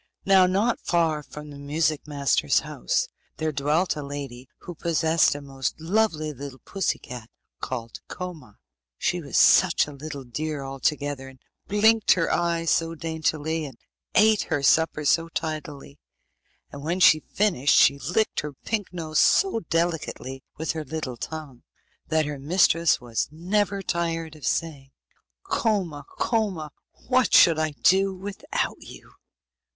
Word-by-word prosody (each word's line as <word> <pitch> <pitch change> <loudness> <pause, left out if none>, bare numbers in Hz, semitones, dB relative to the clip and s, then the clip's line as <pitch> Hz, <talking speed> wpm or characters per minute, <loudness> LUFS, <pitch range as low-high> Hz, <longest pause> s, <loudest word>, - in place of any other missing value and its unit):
Now 190 -1 +6
not 205 +6 +1
far 165 -3 +1
from 150 0 -10
the 140 - -10
music 150 +1 -1
master's 140 -3 +1
house - - -1 0.3
there 155 0 -1
dwelt 150 +5 0
a 150 - -5
lady 140 -3 -7
who 175 - -8
possessed 160 -1 +2
a 145 - -6
most 135 -1 -4
lovely 160 -3 0
little 140 0 -8
pussy 195 -2 -1
cat 120 -2 -10 0.3
called 115 -3 -5
Koma. 165 - -8 0.4
She - - -1
was - - -3
such - - +5
a 150 - -9
little 145 0 -7
dear 145 +4 -4
altogether, 135 0 -2
and 135 -1 -17 0.3
blinked 220 +2 +4
her 170 -2 0
eyes 170 -1 0
so 165 0 +1
daintily, 160 0 -2
and 135 -5 -8 0.4
ate 215 +1 +5
her 145 -4 -1
supper 155 +1 +3
so 165 +3 +2
tidily, 150 -3 -5 0.7
and 140 - -9
when 170 +5 -2
she 160 -3 +7
had - - -26
finished 180 -10 +3
she 140 - +5
licked 180 +10 0
her 150 -1 -5
pink 205 +8 -4
nose 160 -3 -2
so 385 - +4
delicately 160 -6 -2
with 160 0 -1
her 160 -1 -4
little 155 -5 -5
tongue, 145 -1 -7 0.5
that 160 -1 +1
her 145 -1 -5
mistress 170 +2 +3
was 120 -2 -2
never 195 +5 -1
tired 165 -2 -2
of 145 -4 -6
saying, 140 -3 -2 0.5
'Koma, 180 - -1
Koma, 195 -10 -1 0.4
what 255 -2 +3
should 165 -2 +7
I 155 -1 -1
do 190 +1 +4
without 205 - -4
you? - - -13
155 Hz, 145 wpm, -25 LUFS, 140-175 Hz, 0.7 s, she